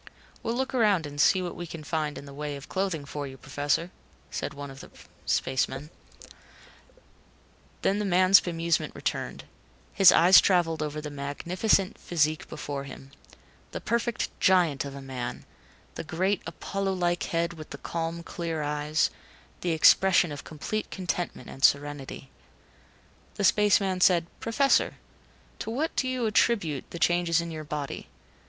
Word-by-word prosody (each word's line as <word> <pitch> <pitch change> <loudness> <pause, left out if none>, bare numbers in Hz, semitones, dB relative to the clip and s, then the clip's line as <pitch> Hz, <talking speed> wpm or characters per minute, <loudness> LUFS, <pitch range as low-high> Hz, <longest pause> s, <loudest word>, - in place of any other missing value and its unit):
"We'll 230 - -2
look 265 +2 -2
around 210 -9 +3
and 145 0 -2
see 185 +3 +4
what 175 - -5
we 175 - -6
can 160 -1 -8
find 150 -1 -2
in - - -9
the 140 - -11
way 145 0 -4
of 140 +1 -10
clothing 185 -6 -2
for 145 0 -5
you, 135 0 -10
Professor," 145 +6 -1 0.6
one 140 -1 -8
of 135 - -12
the - - -11 0.4
spacemen 135 +3 -1 0.3
said. - - -14 1.5
Then 200 +2 +2
the 210 - -1
man's 185 +1 +6
bemusement 170 -1 -1
returned. - - -3 0.5
His 195 -3 +8
eyes 180 +3 +8
traveled 170 -4 +2
over 150 0 -3
the 150 -1 -6
magnificent 175 +8 0
physique 155 -2 0
before 140 -1 -5
him. 135 0 -11 0.6
The - - -3
perfect 235 0 -1
giant 170 -7 +3
of 140 -1 -7
a 140 - -8
man; 125 -2 -5 0.5
the - - -6
great, 185 +5 0
Apollo 195 +4 -3
like 175 -1 0
head 170 0 -1
with 155 -2 -10
the - - -7
calm, 165 0 -4
clear 165 -3 -4
eyes; 150 +2 0 0.5
the 175 - -2
expression 170 +1 +5
of 145 - -7
complete 190 +8 -4
contentment 180 -7 -4
and 135 - -10
serenity. 140 -2 +1 1.0
The 205 - -3
space 210 +1 +5
man 190 -2 -2
said, 175 -2 +5
"Professor 275 +5 +2 0.6
to - - -4
what 285 +8 -2
do 260 - 0
you 255 -2 -1
attribute 205 - +1
the - - -7
changes 175 -1 +2
in 170 0 -4
your 155 -1 -6
body. 145 -2 -5
165 Hz, 155 wpm, -27 LUFS, 145-190 Hz, 1.5 s, His